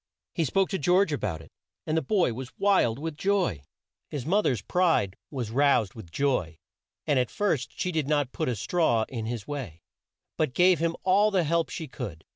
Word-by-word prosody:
He 165 - 0
spoke 190 +8 +1
to 190 - -2
George 180 +2 +3
a - - 0
bout 80 -6 -3
it, - - -18 0.3
and 155 - -1
the 160 - +2
boy 185 - +1
was 130 +2 -8
wild 190 - +3
with 160 +1 -5
joy. 190 - 0 0.5
His 140 -5 -5
mo 195 +7 +3
ther's 120 - 0
pride 165 - +1
was 125 -6 -4
roused, 135 -6 +3
and 110 - -3
at 125 - 0
first 140 - -1
she 180 - 0
did 155 -5 -1
not 145 -3 +1
put - - -2
a 125 - -1
straw 115 - +1
in 115 -4 -4
his 115 -3 -5
way, 120 - -6 0.5
but 155 -5 0
gave 180 -2 +5
him 165 0 0
all 200 +3 +4
the 190 -4 +2
help 165 +1 +1
she 160 - -5
could. 105 - -7
145 Hz, 195 wpm, -27 LUFS, 115-175 Hz, 0.5 s, gave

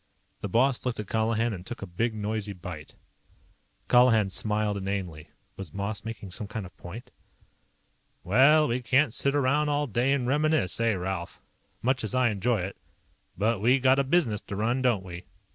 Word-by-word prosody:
'" - - -42
The 100 - -4
boss 125 +5 +2
looked 125 -3 -2
at 105 - -3
Colihan 110 +2 0
and 90 -3 -7
took 120 +2 -7
a - - -3
big 110 +6 -2
noisy 105 -1 -3
bite. 85 -5 -9 0.9
Colihan 115 -5 +4
smiled 105 +2 0
inanely. 95 -6 -4 0.3
Was 95 -6 -8
Moss 100 0 -3
making 110 -4 -7
some 100 +3 -4
kind 110 -1 -5
of 90 - -13
point? 100 +8 -10 1.1
"Well, 140 - +5
we 120 +2 -1
can't 130 +1 +2
sit 140 +2 +1
around 145 +2 +2
all 145 0 +1
day 125 +2 0
and 140 -3 +1
reminisce, 150 - +1
eh, 115 -2 +2
Ralph? 90 -1 -4 0.4
Much 130 0 +1
as 110 +3 -3
I 130 -2 +3
enjoy 110 +1 0
it. 95 +2 -5 0.6
But 105 +1 0
we 125 +5 +4
got 130 +1 +4
a - - +3
business 135 -8 +1
to 100 - -7
run, 120 +5 0
don't 120 -7 +1
we?" 90 0 -8
110 Hz, 180 wpm, -27 LUFS, 100-130 Hz, 1.1 s, Well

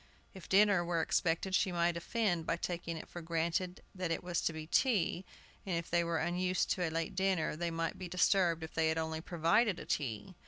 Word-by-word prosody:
If 190 -3 -11
dinner 200 -2 +5
were 170 -1 0
expected 170 +3 0
she 190 - +2
might 170 0 +1
offend 175 -1 -1
by 165 - +1
taking 170 -1 -4
it - - -8
for 175 - -8
granted 170 +2 -2
that 185 -3 -3
it 165 - -2
was 175 -1 -1
to - - 0
be 160 -1 -6
"tea," 190 - +1 0.4
and 185 -3 -1
if 170 - -5
they 170 0 +3
were 170 -1 -1
unused 180 +2 0
to 185 - 0
a 170 - +1
late 165 +2 -3
dinner 190 -5 +1
they 170 +2 -2
might 165 0 -3
be 185 - -5
disturbed 180 -2 +2
if 160 - -7
they 160 -1 +2
had 160 - 0
only 160 0 -2
provided 175 +5 +2
a - - -8
"tea." 115 - -3
170 Hz, 220 wpm, -34 LUFS, 165-185 Hz, 0.4 s, dinner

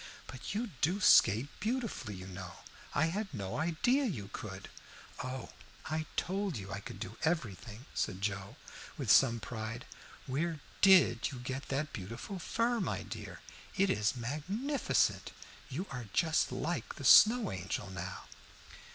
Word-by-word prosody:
But 130 +9 -7
you 225 0 -2
do 180 +6 +2
skate 115 - +6
beautifully, 225 - -2
you 95 0 -8
know. 95 -2 -7 0.4
I 155 - +4
had 205 0 -3
no 100 -8 -4
idea 175 - +2
you 105 - -4
could." - - -7 0.6
"Oh, 130 -1 -5 0.4
I 155 0 -2
told 195 - -1
you 95 -1 -7
I 100 - -3
could - - -9
do 105 - -7
everything," 120 - -2
said 90 - -1
Joe, 100 -1 -3 0.4
with - - +1
some 120 -3 +6
pride. 115 +1 -5 0.4
"Where 155 +4 -1 0.2
did 185 - +6
you 135 - -7
get 130 +3 -5
that 140 +2 -2
beautiful 115 - -6
fur, 235 +7 0
my 190 - -2
dear? - - -8 0.4
It 195 0 +4
is 105 +3 +1
magnificent. 185 - 0 0.4
You 150 +8 -3
are 125 -4 -5
just 160 -2 +2
like 170 +2 -3
the 140 - -7
Snow 225 - +8
Angel 95 +2 -3
now." 90 0 -6
135 Hz, 145 wpm, -33 LUFS, -, 0.6 s, Snow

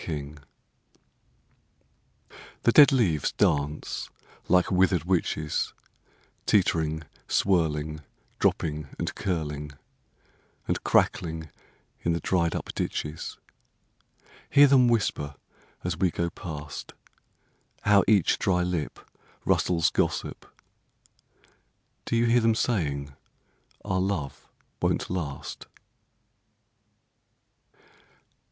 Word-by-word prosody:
March 75 -2 -5 2.3
THE 120 - +5
DEAD 145 +3 +8
leaves 95 - +2
dance 75 +1 0 0.4
like 90 +1 +3
withered 90 -3 +3
witches; 80 -4 -1 0.7
Teetering, 80 -6 +2 0.2
swirling, 75 -5 +1 0.4
Dropping 75 -2 0
and - - -3
curling, 75 -6 -3 0.9
And - - -1
crackling 80 -3 +1 0.5
in 85 - +1
the 85 - -1
dried 85 0 +1
up - - -4
ditches. 75 +1 -4 1.1
Hear 145 - +7
them 135 -3 +5
whisper 85 -11 0 0.5
as 90 -2 -1
we 90 +2 +2
go 85 0 -2
past. 75 -4 -7 0.9
How 105 -1 +5
each 100 -5 +3
dry 90 -2 +2
lipRustles 85 0 -1
gossip! - - -1 1.6
Do - - -1
you 115 +1 +3
hear 120 +1 +4
them 115 0 +3
saying 70 - -1 0.7
our 95 -2 0
love 90 -8 -3 0.3
won't - - 0
last? 75 -7 -5
85 Hz, 85 wpm, -27 LUFS, 75-95 Hz, 2.3 s, DEAD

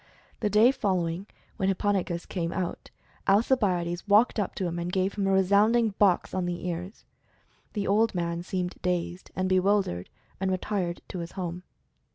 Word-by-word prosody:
The 210 - 0
day 215 +5 +6
following, 185 -5 -1 0.3
when 195 -3 +1
Hipponikos 190 -3 0
came 170 -3 -2
out, 180 -2 -4 0.4
Alcibiades 195 -5 +2
walked 215 +3 +4
up 200 - -2
to 190 - -2
him 170 0 -2
and 175 +1 -3
gave 190 +1 0
him 200 -2 -1
a - - +2
resounding 205 +5 +4
box 195 -4 +3
on 185 -1 -1
the 175 0 -4
ears. 180 +4 -5 0.7
The 205 -2 -2
old 215 +1 +2
man 170 -1 -1
seemed 180 0 -3
dazed 180 0 -2
and 185 0 0
bewildered 185 - +1 0.3
and 190 0 0
retired 185 -2 -2
to 185 - -5
his 170 0 -6
home. 180 -2 -4
185 Hz, 165 wpm, -27 LUFS, 175-205 Hz, 0.7 s, day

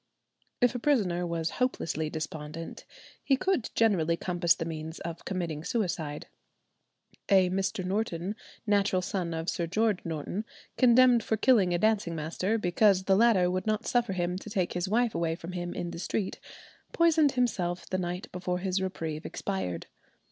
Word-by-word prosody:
If 245 +1 +4
a 245 - -3
prisoner 190 -11 +1
was 165 -1 -2
hopelessly 160 - 0
despondent, 155 +1 -6 0.4
he 270 - +3
could 375 - 0
generally 170 -7 +3
compass 175 -1 +2
the 165 - -4
means 160 0 -6
of 170 -1 -6
committing 170 -5 -3
suicide. 170 -9 -2 1.0
A 190 -3 +5
Mr. 190 +1 -1
Norton, 190 -1 -2 0.3
natural 200 -3 +2
son 180 -2 -2
of 160 +1 -4
Sir 170 -2 -1
George 215 +2 +1
Norton, 165 +5 -3 0.3
condemned 250 -1 +6
for 220 - 0
killing 215 -6 +4
a 175 - +2
dancing 205 -3 +1
master, 170 +7 -1
because 190 0 +3
the 190 0 +3
latter 195 -5 +4
would 185 +2 -2
not 215 +1 0
suffer 240 -5 +1
him 180 0 -1
to 215 - -9
take 190 -4 -1
his 180 +1 -2
wife 235 +2 +2
away 165 -1 0
from 170 +1 -8
him 175 -1 -4
in 175 - -3
the 170 - -7
street, 190 +2 -2 0.5
poisoned 320 -4 +4
himself 185 -9 -1
the 185 - -1
night 180 +1 -3
before 180 0 -2
his 190 +1 -1
reprieve 160 -4 -3
expired. 90 - -3
185 Hz, 160 wpm, -29 LUFS, 170-215 Hz, 1.0 s, condemned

